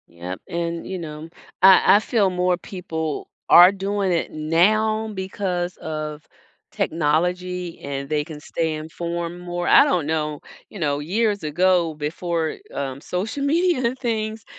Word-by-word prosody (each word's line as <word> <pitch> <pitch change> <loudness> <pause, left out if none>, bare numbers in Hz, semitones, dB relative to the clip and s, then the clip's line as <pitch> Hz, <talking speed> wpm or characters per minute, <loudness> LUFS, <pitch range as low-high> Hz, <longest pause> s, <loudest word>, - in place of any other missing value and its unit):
Yep 90 +2 -7
and 170 -1 -3
you 190 - -4
know 155 -1 -7 0.3
I 190 +1 +7
I - - +6
feel 215 -3 +1
more 180 0 +1
people 160 -5 -5 0.2
are 175 +2 +9
doing 200 0 -1
it 170 - -1
now 215 +8 +2
because 185 -2 -3
of 155 -1 -5 0.5
technology 175 +3 -1
and 140 -1 -5
they 150 0 0
can 150 -1 -9
stay 160 +1 -2
informed 170 +2 -5
more. 175 0 -4
I - - +8
don't 170 -5 0
know, 150 -2 -1 0.3
you 205 - -10
know, 145 -3 0
years 205 +5 0
ago 175 +2 +2
before, 160 +2 -2 0.2
um, 135 -1 -4
social 210 - -3
media 295 -5 +2
things 220 -3 -3
175 Hz, 140 wpm, -22 LUFS, 155-195 Hz, 0.5 s, are